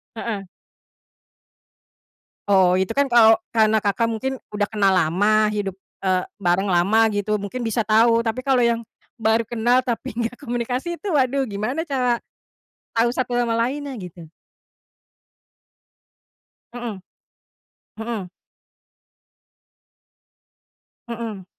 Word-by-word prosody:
Heeh. 220 -3 -4 2.0
Oh, 185 -2 +4
itu 190 +4 -1
kan 280 +2 +1
kalau 225 -2 +6
karena 220 -1 +3
Kakak 205 +3 +1
mungkin 230 +4 -2 0.2
udah 205 -1 -1
kenal 200 -3 +2
lama, 205 +6 +3
hidup, 205 -2 -2 0.3
eee, 185 -1 +2 0.2
bareng 190 0 +1
lama, 200 +6 +3
gitu. 210 0 -1
Mungkin 235 +5 -4
bisa 225 +1 0
tahu, 230 +2 +4
tapi 230 +2 -3
kalau 265 -2 +3
yang 235 -1 +1 0.3
baru 225 0 +2
kenal, 240 +2 +2
tapi 235 -4 -4
enggak 235 +1 -3
komunikasi 250 +4 -3
itu, 415 - -4
waduh, 275 -4 +2
gimana 215 +10 -2
cara 255 -6 0 0.8
tahu 235 +1 +3
satu 250 -1 -2
sama 240 -1 +1
lainnya, 270 +5 -1
gitu. 170 -3 -11 2.4
Mhm. 235 -5 -6 1.0
Mhm. 220 -4 -4 2.8
Mhm. 225 -5 -6
225 Hz, 110 wpm, -22 LUFS, 205-245 Hz, 2.8 s, kalau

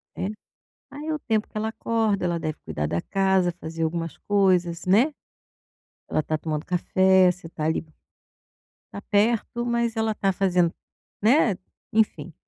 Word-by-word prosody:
É, 185 - -2 0.6
aí 290 +2 -8
é 315 - -1
o 305 - -3
tempo 220 -6 -1
que - - -16
ela 215 +1 -1
acorda, 225 -3 0
ela 170 -1 0
deve 155 -1 -3
cuidar 75 -1 -2
da 85 +3 -1
casa, 190 - +1
fazer 165 -1 -6
algumas 165 0 -2
coisas, 185 -4 +2
né, 225 +11 +4 1.0
ela - - 0
está 155 +1 -1
tomando 155 0 -3
café, 185 +1 +4
você 180 -1 -10
está 160 -2 -6
ali, 160 +1 0 1.1
tá 200 - -7
perto 230 +3 +1
mas 235 -1 0
ela 220 0 +1
está 195 -2 0
fazendo, 180 -3 +2 0.5
né, 225 - +4 0.4
enfim, 215 -5 +1
190 Hz, 155 wpm, -25 LUFS, 170-220 Hz, 1.1 s, né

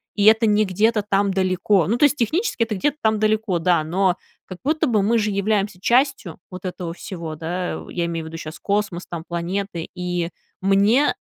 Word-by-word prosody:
и 205 - +1
это 220 +1 +6
не 210 0 +3
где-то 210 +3 +1
там 195 0 +2
далеко. 185 -1 +2
Ну, 230 - +1
то 295 - +1
есть 295 +1 +2
технически 280 - 0
это 220 -2 -3
где-то 290 +9 0
там 220 -1 +2
далеко, 215 -4 +1
да, 170 -2 +2
но, 185 +2 +1 0.3
как 185 - -9
будто 310 +3 +1
бы, 220 -4 +2
мы 230 +3 +3
же 210 -1 0
являемся 200 -1 0
частью 235 - +1
вот 185 0 -8
этого 180 -2 -4
всего, 170 -4 -7
да, 175 +3 -3
я 170 -1 -2
имею 165 -1 -4
в - - -7
виду 165 - -9
щас 155 0 -8
космос, 200 -3 -1
там, 165 -2 -5
планеты. 175 0 -3
И 180 -1 -2 0.3
мне 200 +8 +3
195 Hz, 195 wpm, -22 LUFS, 175-220 Hz, 0.3 s, это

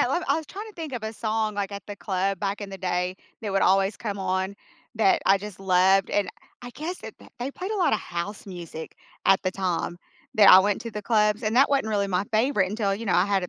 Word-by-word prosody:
I 275 +8 +2
I - - +3
was 320 -1 -5
trying 410 +7 -7
to - - -12
think 320 -5 -6
of 240 - -4
a 220 - -3
song, 220 -1 -1
like, 200 -1 -2
at 200 0 -7
the 205 - -6
club 195 -1 -1
back 200 +1 -2
in 200 -1 -6
the 195 - -7
day 180 0 -1 0.3
that 205 - -3
would 195 - +2
always 195 +1 +3
come 205 -3 -4
on 190 +1 -1 0.4
that 210 -4 +3
I 195 0 +5
just 205 -1 -9
loved 190 +1 +3
and 200 -3 +1 0.3
I 245 - -7
guess 330 +7 -5
that - - -9
that - - -17
they 250 +3 -3
played 370 +8 -6
a 430 - -1
lot 355 - +2
of 215 - +1
house 175 +5 -5
music 170 -4 -8 0.3
at 195 - +5
the 185 - 0
time 180 -2 -2 0.4
that 205 -2 +7
I 185 - +11
went 200 +1 +2
to 230 - -6
the 210 -1 -6
clubs 210 0 +2
and 215 +1 0
that 275 +2 +6
wasn't 270 -6 +1
really 200 -2 0
my 185 0 0
favorite 215 -3 +2
until, 205 -1 -1
you 225 +2 -6
know, 185 - +1
I 180 - +4
had 195 -2 +1
a - - -6
200 Hz, 265 wpm, -25 LUFS, 190-220 Hz, 0.4 s, I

